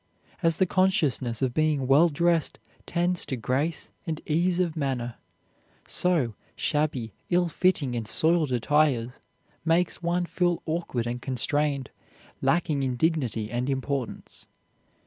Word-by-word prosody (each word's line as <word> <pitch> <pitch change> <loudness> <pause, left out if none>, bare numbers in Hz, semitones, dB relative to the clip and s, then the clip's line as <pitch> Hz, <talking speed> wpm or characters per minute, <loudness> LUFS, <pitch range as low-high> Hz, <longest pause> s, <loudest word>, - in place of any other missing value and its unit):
As 165 -2 +3
the 190 - +3
consciousness 155 - +1
of 125 -2 +1
being 155 -3 +1
well 145 +6 +5
dressed 170 +1 +1 0.3
tends 175 +1 +1
to 130 - -2
grace 140 +8 -1 0.2
and 160 -2 -2
ease 175 +3 +1
of 170 -3 0
manner, 130 -6 -2 0.7
so 165 -11 +1 0.2
shabby, 145 -8 -1 0.2
ill 175 0 +3
fitting, 165 -6 +1
or 115 - -2
soiled 160 +2 +2
attire 125 -1 +2 0.5
makes 170 +2 +1
one 175 +1 0
feel 175 0 0
awkward 160 -7 -2
and 120 +1 -3
constrained, 140 +2 0 0.5
lacking 165 -5 +1
in 130 -2 -1
dignity 120 -8 0
and 125 +2 -1
importance. 135 -2 -4
150 Hz, 125 wpm, -27 LUFS, 130-170 Hz, 0.7 s, well